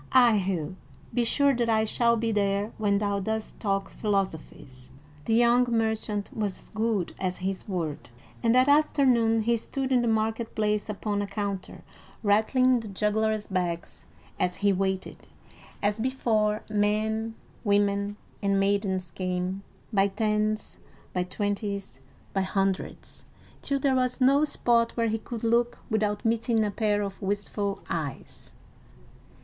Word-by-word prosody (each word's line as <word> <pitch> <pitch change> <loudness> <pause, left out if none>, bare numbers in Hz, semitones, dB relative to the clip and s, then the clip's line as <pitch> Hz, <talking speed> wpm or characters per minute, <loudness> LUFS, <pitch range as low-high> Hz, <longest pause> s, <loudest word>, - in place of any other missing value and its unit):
"Ay, 245 -4 +6
Hugh, 185 -3 -2 0.4
be 245 - +2
sure 280 +4 +3
that 240 -2 0
I 220 -1 +3
shall 235 +1 +2
be 225 0 0
there 200 0 0
when 205 -2 +2
thou 200 -1 0
dost 220 +2 -3
talk 195 -2 0
philosophies." 160 - -3 0.4
The 225 - +2
young 240 +1 +4
merchant 220 -2 -1
was 205 -4 -3
good 215 -4 -1
as 185 -1 -2
his 190 0 -3
word, 165 -9 -3 0.3
and 230 0 +3
that 255 +1 +5
afternoon 255 -7 +4
he 235 +2 +3
stood 265 +4 -3
in 250 -2 +4
the 240 - 0
market 220 +1 0
place 210 0 0
upon 205 0 -2
a 200 - -2
counter, 200 -3 -4 0.4
rattling 240 +5 +3
the 225 - -7
juggler's 210 +1 0
bags 175 -3 -3 0.3
as 180 0 +1
he 200 0 +2
waited. 190 0 -2 0.6
As 205 +1 +1
before, 220 -4 +1
men, 220 +2 0 0.3
women, 200 -1 +1 0.2
and 200 -1 +2
maidens 195 -3 0
came, 185 +1 -2 0.3
by 195 -1 +4
tens, 215 +1 -1 0.3
by 180 - 0
twenties, 200 - -3 0.3
by 195 - +1
hundreds, 195 0 -2 0.4
till 280 - 0
there 275 0 +2
was 255 0 +1
no 275 +3 +5
spot 235 -5 +1
where 230 -1 +2
he 225 +1 -1
could 230 +1 -7
look 235 +1 +2
without 210 -1 0
meeting 225 0 +2
a 205 - -1
pair 205 -1 +1
of 195 -1 -6
wistful 200 0 -2
eyes. 140 - -5
210 Hz, 145 wpm, -27 LUFS, 195-230 Hz, 0.6 s, Ay